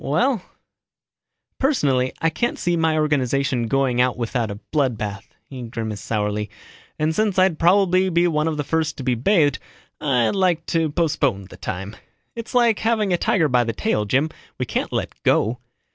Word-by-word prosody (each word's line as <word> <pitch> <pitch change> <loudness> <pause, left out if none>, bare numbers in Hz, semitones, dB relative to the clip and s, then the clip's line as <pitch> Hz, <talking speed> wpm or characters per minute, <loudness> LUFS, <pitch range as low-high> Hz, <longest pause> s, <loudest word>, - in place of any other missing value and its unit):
Well, 215 - +1 1.2
personally 140 - +1
I 165 - +1
can't 240 +10 -1
see 175 0 0
my 160 -1 +1
organization 140 -4 +1
going 130 -1 +1
out 125 0 +1
without 120 -1 -2
a 100 - -4 0.2
blood 135 -7 +1
bath." 100 -2 -5 0.2
He 130 -2 -8
grimaced 110 -3 -5
sourly, 105 -1 -1 0.5
"And 155 +1 0
since 210 0 0
I'd 185 -4 +3
probably 185 +1 +4
be 175 0 +3
one 155 -2 0
of 160 -2 -1
the 145 - -1
first 160 +2 -1
to 135 - -6
be 125 -1 +1
bathed, 145 - +2 0.4
I'd 125 -6 +1
like 180 -4 +1
to 165 -2 +2
postpone 145 - 0
the - - -11
time. 95 +4 -5 0.4
It's 230 +1 -7
like 235 -3 +4
having 220 -4 +1
a - - +3
tiger 165 -6 +2
by 125 -3 +3
the 115 -1 -2
tail, 115 - 0
Jim. 135 +9 +1 0.3
We - - -2
can't - - -2
let - - -2
go." 115 +4 +2
145 Hz, 175 wpm, -22 LUFS, 120-175 Hz, 1.2 s, probably